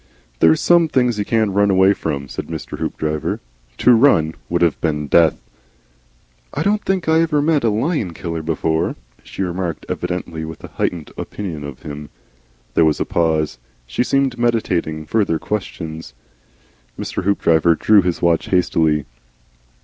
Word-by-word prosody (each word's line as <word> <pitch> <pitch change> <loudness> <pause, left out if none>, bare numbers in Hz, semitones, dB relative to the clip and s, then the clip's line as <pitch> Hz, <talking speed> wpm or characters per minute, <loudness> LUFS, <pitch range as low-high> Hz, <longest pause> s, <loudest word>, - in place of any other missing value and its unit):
"There's 80 -1 +5
some 170 -1 +4
things 125 -6 +1
you 100 - -1
can't 110 -2 +1
run 100 +1 +3
away 95 +1 +5
from," 70 -7 -4
said - - -6
Mr. - - -6
Hoopdriver. 75 -1 -2 0.4
"To 125 - +5
run 110 - +4 0.2
would 85 0 +1
have 85 -3 +1
been 75 -2 -1
Death." 80 +2 +4 1.2
"I - - 0
don't 210 +1 +1
think 190 -3 -1
I 160 +1 +4
ever 155 -3 +1
met 150 -1 +2
a 115 - +3
lion 110 - -1
killer 85 -1 -4
before," 80 0 -1 0.3
she 95 - -5
remarked, 90 -2 -3
evidently 85 -3 -4
with 80 0 -8
a - - -8
heightened 85 -4 -3
opinion 85 -8 -5
of 70 -3 -9
him. 75 0 -7 0.6
There 85 - +4
was 80 -1 +2
a - - 0
pause. 80 -6 0 0.3
She - - -1
seemed 135 -2 0
meditating 90 -10 0
further 100 -1 +1
questions. 80 -9 -5 0.8
Mr. - - -4
Hoopdriver 85 -4 +3
drew 105 +4 +5
his 90 -1 -2
watch 85 -1 +2
hastily. 80 -5 +2
85 Hz, 155 wpm, -19 LUFS, 80-110 Hz, 1.2 s, There's